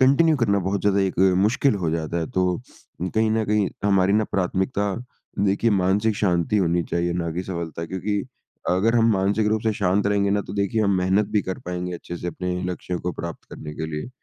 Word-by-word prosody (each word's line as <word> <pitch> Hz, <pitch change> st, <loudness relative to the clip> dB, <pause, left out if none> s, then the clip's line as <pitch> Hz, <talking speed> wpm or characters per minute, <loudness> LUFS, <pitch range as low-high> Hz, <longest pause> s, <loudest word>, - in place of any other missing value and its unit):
Continue 140 Hz, +4 st, +5 dB
करना 100 Hz, -5 st, +2 dB
बहुत 100 Hz, 0 st, 0 dB
ज़्यादा 100 Hz, -1 st, +2 dB
एक 95 Hz, -2 st, -1 dB, 0.2 s
मुश्किल 110 Hz, +5 st, +3 dB
हो 80 Hz, -, +1 dB
जाता 80 Hz, +1 st, -2 dB
है। 80 Hz, -, -2 dB
तो 95 Hz, 0 st, +1 dB, 0.7 s
कहीं 110 Hz, 0 st, +3 dB
न 110 Hz, 0 st, +1 dB
कहीं 105 Hz, -2 st, +2 dB, 0.2 s
हमारी 100 Hz, -1 st, +3 dB
ना 110 Hz, +1 st, +3 dB
प्राथमिकता 95 Hz, +2 st, -1 dB, 0.6 s
देखिए 100 Hz, +4 st, +2 dB
मानसिक 100 Hz, +3 st, +2 dB
शांति 90 Hz, +1 st, +1 dB
होनी 85 Hz, -3 st, +2 dB
चाहिए, 85 Hz, +1 st, -1 dB
ना 85 Hz, -1 st, -2 dB
कि 90 Hz, +3 st, -3 dB
सफलता 85 Hz, -3 st, -5 dB
क्योंकि 100 Hz, +4 st, -2 dB, 0.5 s
अगर 110 Hz, +6 st, +3 dB
हम 115 Hz, 0 st, +4 dB
मानसिक 100 Hz, +2 st, +1 dB
रूप 110 Hz, 0 st, +1 dB
से 110 Hz, -1 st, +1 dB
शांत 100 Hz, 0 st, +1 dB
रहेंगे 100 Hz, -1 st, +2 dB
ना, 100 Hz, 0 st, +2 dB
तो -, -, -8 dB
देखिए 100 Hz, +2 st, 0 dB
हम 100 Hz, -1 st, +2 dB
मेहनत 95 Hz, +3 st, +2 dB
भी 105 Hz, -, +3 dB
कर 95 Hz, -, -4 dB
पाएँगे 90 Hz, 0 st, -3 dB
अच्छे 85 Hz, +1 st, -7 dB
से 90 Hz, -, -6 dB
अपने 90 Hz, +2 st, -3 dB, 0.2 s
लक्ष्यों 90 Hz, 0 st, -4 dB
को 90 Hz, 0 st, -2 dB
प्राप्त 85 Hz, -1 st, -7 dB
करने 75 Hz, -1 st, -8 dB
के 80 Hz, -, -4 dB
लिए। 75 Hz, +8 st, -4 dB
95 Hz, 205 wpm, -23 LUFS, 90-105 Hz, 0.7 s, Continue